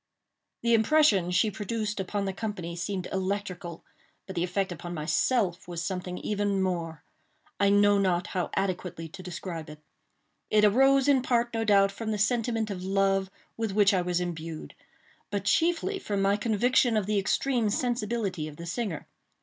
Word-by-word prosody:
The 235 0 +3
impression 225 - +4
she 185 +4 +2
produced 210 +1 -3
upon 200 +1 -2
the 195 - -2
company 185 -5 -5
seemed 185 +1 -3
electrical—but 195 - -6
the 170 - 0
effect 185 +1 -1
upon 175 +1 -6
myself 175 +4 0
was 170 -1 -4
something 180 -1 -4
even 205 -1 -1
more. 170 -5 -2 0.6
I 200 - +4
know 205 0 +5
not 185 -2 +1
how 180 -2 -1
adequately 180 -3 -2
to 185 - -10
describe 175 -3 -6
it. 150 - -9 0.7
It 210 0 +4
arose 270 +5 +4
in 275 -2 +4
part, 240 -1 +1
no 225 0 0
doubt, 200 -2 +4
from 220 +2 -5
the 215 - 0
sentiment 225 0 0
of 180 -2 -5
love 195 0 +1 0.3
with 225 -3 -2
which 205 0 +4
I 185 - +2
was 175 0 0
imbued; 165 -2 -5 0.6
but 200 -1 -3
chiefly 350 - +1
from 205 - -2
my 195 +1 +3
conviction 230 +2 +2
of 210 - 0
the 210 0 +1
extreme 235 +3 +1
sensibility 215 -8 -1
of 150 -1 -10
the 170 - -7
singer. 180 -2 -4
200 Hz, 165 wpm, -28 LUFS, 180-220 Hz, 0.7 s, know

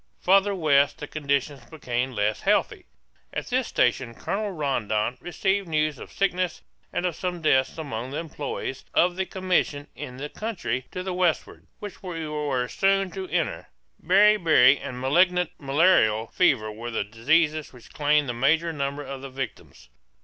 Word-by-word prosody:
Farther 195 +2 +3
west 145 -5 +3
the - - -6
conditions 140 -2 -2
become 125 -3 -3
less 105 -1 0
healthy. - - +1 0.4
At - - -4
this - - 0
station 115 - +1
Colonel 210 - -3
Rondon 125 - -1
received 190 +2 -1
news 155 -3 0
of - - -10
sickness 185 -2 -1 0.3
and 180 - -2
of 175 -3 -1
some 180 0 -3
deaths 130 -2 +2
among 130 -6 -5
the 140 - -5
employees 145 -4 -5
of 175 0 +3
the 190 0 -2
commission 180 -6 0
in 130 -3 -8
the 145 +2 -5
country 150 - -4
to 180 - -5
the 185 -1 -3
westward, 180 -3 -1
which 205 -3 -9
we 165 -4 -5
were 145 -5 -1
soon 195 +4 +1
to 190 -1 -6
enter. 155 - -2 0.4
Beriberi 180 -7 +5
and 125 -1 -6
malignant 180 +6 +2
malarial 135 -7 +3
fever 125 -12 +2
were 115 +3 -7
the 115 - -1
diseases 150 +9 +1
which 125 -2 -16
claimed 150 0 +2
the 120 - -2
major 160 +7 +2
number 140 0 -3
of 135 -1 -7
the 135 - -7
victims. 130 - -7
150 Hz, 160 wpm, -25 LUFS, 130-180 Hz, 0.4 s, Beriberi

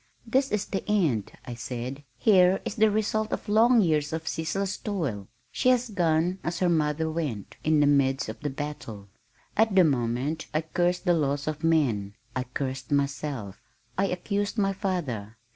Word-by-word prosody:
"This 265 +4 +1
is 210 -1 0
the 195 - -3
end," 160 - +1
I 125 - -5
said. 125 +3 -5
"Here 185 - +5
is - - -2
the 220 -1 +4
result 215 +1 0
of - - -3
long 225 +3 +5
years 155 -5 +1
of 160 0 -4
ceaseless 195 +5 -2
toil. 140 - -3 0.2
She 255 - +2
has 250 -2 +2
gone 175 0 +1
as 170 0 -2
her 180 0 +2
mother 160 -1 +1
went, 150 - -4
in 155 -1 +3
the - - +5
midst 135 -1 +2
of 110 +1 -6
the 145 - -2
battle." 135 -8 -6 0.5
At 220 -2 +3
the 185 - +7
moment 135 +2 0
I 155 - +3
cursed 175 +3 0
the 175 - +4
laws 145 -3 0
of 155 0 -3
man, 120 -12 +1 0.2
I 130 0 -1
cursed 130 0 -4
myself. 140 -7 -2 0.3
I 195 - +1
accused 200 +4 -2
my 195 -2 +2
father. 145 - -3
160 Hz, 175 wpm, -27 LUFS, 135-195 Hz, 0.5 s, the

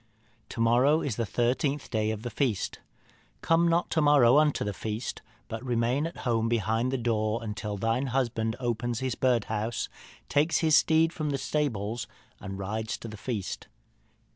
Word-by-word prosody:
To - - -7
morrow 125 +7 +4
is 130 -7 -2
the 115 -1 -2
thirteenth 130 +6 0
day 110 -2 +1
of 110 0 -4
the 120 - -4
feast. 120 -8 -1 0.6
Come 165 +1 +3
not 170 +1 +1
to 160 - +2
morrow 145 -3 +6
unto 150 -1 +2
the 105 - -2
feast, 110 +4 -4 0.3
but 115 +1 -6
remain 125 +4 +1
at 170 - -9
home 115 -2 +1
behind 115 +2 +1
the 135 - 0
door 110 -2 0
until 105 -1 -4
thine 115 +6 0
husband 115 -3 0
opens 120 -1 -2
his 130 -2 -1
birdhouse, 110 -3 0 0.4
takes 150 +3 +2
his 160 -2 +4
steed 160 +2 +4
from 155 -2 -2
the 140 - 0
stable, 120 -7 -1 0.4
and 95 +1 -6
rides 110 +3 -3
to - - -8
the 110 - -8
feast. 105 -3 -4
120 Hz, 165 wpm, -28 LUFS, 110-140 Hz, 0.6 s, morrow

